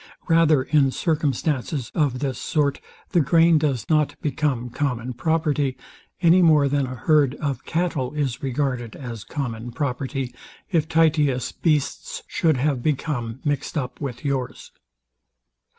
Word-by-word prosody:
Rather, 165 -5 +4
in 140 -1 +3
circumstances 145 -3 -1
of 145 -5 +1
this 135 -1 -3
sort 145 -3 0 0.3
the 175 - +4
grain 165 +2 +5
does 140 -6 -1
not 155 -2 +1
become 135 -5 -1
common 125 -3 -2
property, 145 -2 0 0.5
any 175 +2 +6
more 155 -4 +5
than 140 -1 0
a 130 - -6
herd 145 +2 +3
of 140 -4 -3
cattle 160 -7 -1
is 140 -5 -2
regarded 130 -4 -2
as 120 -6 -7
common 120 -5 -5
property, 135 -1 -3 0.4
If 160 -4 +2
Titius 150 -6 +2
beasts 175 - -1
should 160 - +1
have 135 -1 0
become 135 -4 -2
mixed 145 +2 -1
up 130 -1 -4
with 130 -1 -5
yours. 135 -3 -3
145 Hz, 135 wpm, -23 LUFS, 130-155 Hz, 0.5 s, any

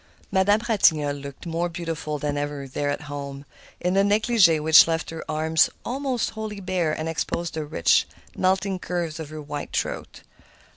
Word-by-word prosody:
Madame 200 +3 +4
Ratignolle 155 -10 +3
looked 140 +3 -9
more 170 +1 -1
beautiful 165 -3 -4
than 145 0 -2
ever 145 -1 -3
there 145 +2 -2
at 145 - -2
home, 140 -1 -7 0.3
in 180 +1 0
a 195 - +5
negligé 205 -5 +4
which 160 +2 +7
left 165 -1 -2
her 165 - -6
arms 160 +1 +3 0.2
almost 260 -1 -1
wholly 215 -2 -6
bare 180 -4 0
and 155 +1 -3
exposed 165 +1 -2
the 155 -1 -3
rich, 145 - +3 0.3
melting 190 0 +1
curves 170 -3 -3
of 155 -2 -6
her 155 -1 -7
white 145 0 -5
throat. - - -4
165 Hz, 165 wpm, -24 LUFS, 150-185 Hz, 0.3 s, which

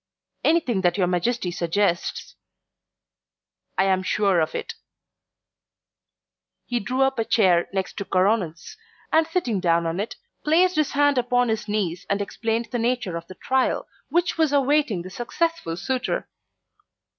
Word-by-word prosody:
"Anything 285 - +2
that 175 0 +2
your 190 - +3
Majesty 180 +3 0
suggests 175 +1 -1 0.7
" - - -57
"I - - +4
am 190 -1 +2
sure 195 -1 +2
of 160 -1 -1
it." - - -4 1.9
He 245 -1 -1
drew 255 +6 0
up 270 -2 +1
a - - +3
chair 185 -6 +3
next 190 -1 -3
to 200 - -3
Coronel's, 185 -4 0 0.4
and 320 0 +4
sitting 325 - -1
down 170 -2 +2
in 165 +2 -2
it, 210 - -3 0.3
placed 350 +4 +3
his 305 -2 +1
hand 285 -1 +3
upon 245 0 +1
his 220 0 -2
knees 195 -5 -2
and 200 - +1
explained 225 +2 -2
the 245 - -1
nature 235 -6 -1
of 170 0 -6
the 185 - -10
trial 260 +5 0 0.2
which 345 -1 0
was 315 -3 +3
awaiting 280 - +2
the 185 - -9
successful 240 - -2
suitor. 255 +4 -2
220 Hz, 150 wpm, -24 LUFS, 185-265 Hz, 1.9 s, I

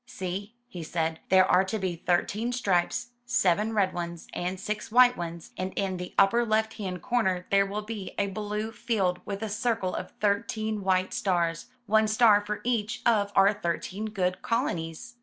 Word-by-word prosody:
"See," 200 -1 -5
he 185 -8 -8
said, 160 0 -2
"there 185 0 +6
are 185 0 +4
to 190 +3 -2
be 185 -4 -2
thirteen 195 +7 0
stripes, 240 +2 0
seven 220 -4 +2
red 195 -3 +2
ones 170 -1 -5
and 180 +1 -3
six 210 +2 -4
white 250 +1 +6
ones, 170 -1 -6
and 185 +1 -3
in 190 -2 -1
the 180 0 -7
upper 215 +5 +5
left 220 0 +1
hand 185 -4 -4
corner 190 -7 0
there 195 0 +4
will 210 +2 -4
be 210 -3 -6
a 200 - +2
blue 210 +2 -3
field 210 -5 -1
with 200 +1 -4
a - - -1
circle 220 -3 -1
of - - -4
thirteen 215 +1 0
white 185 -1 +1
stars, 170 -2 0 0.2
one 220 0 +3
star 215 -1 +5
for 210 0 -4
each 235 -1 -1
of 205 -4 +3
our 195 +2 +6
thirteen 195 +2 -3
good 185 -3 -1
colonies." 175 +1 -2
200 Hz, 175 wpm, -27 LUFS, 185-220 Hz, 0.2 s, there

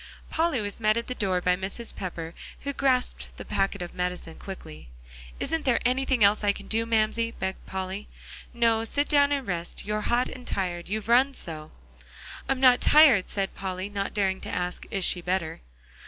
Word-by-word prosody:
Polly 325 -5 +1
was 205 +1 -5
met 215 0 +3
at 235 - -1
the 250 - -4
door 190 -6 0
by 180 0 +3
Mrs. 195 +5 0
Pepper, 170 -3 -5 0.3
who 280 - -3
grasped 260 -2 0
the - - -8
packet 195 -1 -1
of 175 - -8
medicine 180 -2 -4
quickly. 75 - -9 0.5
"Isn't 320 +1 -1
there 260 -4 +3
anything 255 -1 +2
else 205 +1 +4
I 205 -1 +3
can 200 - -10
do, 225 +1 0
Mamsie?" 230 +1 +2
begged 190 0 -4
Polly. 190 +2 -4 0.4
"No; 230 -2 +2
sit 285 +6 0
down 285 -1 +4
and 280 -2 0
rest; 175 -3 -4
you're 210 +1 -1
hot 240 +3 +1
and 250 -1 -10
tired, 175 -2 -2
you've 215 +1 -3
run 260 +4 +4
so." 155 -2 -6 0.8
"I'm 270 -1 +1
not 255 -2 +6
tired," 285 -11 +6
said 195 -1 -2
Polly, 190 0 -4
not 200 -1 -3
daring 190 -2 0
to - - -6
ask 180 0 -3
"Is 195 -2 0
she 180 - +1
better?" 180 - -2
205 Hz, 185 wpm, -27 LUFS, 185-245 Hz, 0.8 s, not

